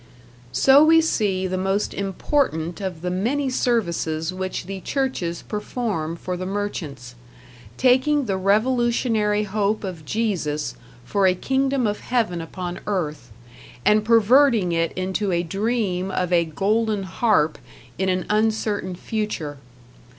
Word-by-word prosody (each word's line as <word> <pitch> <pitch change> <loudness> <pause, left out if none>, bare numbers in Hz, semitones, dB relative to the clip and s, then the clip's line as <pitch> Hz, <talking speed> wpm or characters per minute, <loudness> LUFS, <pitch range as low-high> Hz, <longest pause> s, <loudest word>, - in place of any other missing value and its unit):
So 270 - +6
we 325 +1 +6
see 205 -12 0
the 185 0 -2
most 195 +2 0
important 190 - -1
of 180 -4 -5
the 180 - -1
many 255 +9 0
services 170 -9 0
which 185 0 -4
the 195 0 -6
churches 220 - -2
perform 210 -6 -3
for 180 +2 -4
the 185 +1 -4
merchants 170 - -4 0.6
taking 265 +3 +3
the 195 -4 -1
revolutionary 220 +1 +2
hope 210 +1 -1
of 180 -5 -6
Jesus, 160 -6 -2 0.3
for 200 +4 +2
a 185 - +3
kingdom 265 +4 0
of 210 -1 -1
heaven 220 -9 -1
upon 175 +2 -6
earth, 165 - -3 0.5
and 210 0 +4
perverting 230 -2 +4
it 165 0 +1
into 190 +2 -1
a 175 0 +1
dream 195 0 -1
of 180 -2 -1
a 170 -1 +4
golden 210 +5 0
harp 185 -5 +1 0.4
in 190 0 +1
an 185 0 0
uncertain 215 -3 0
future. 180 - -4
195 Hz, 130 wpm, -23 LUFS, 180-225 Hz, 0.6 s, So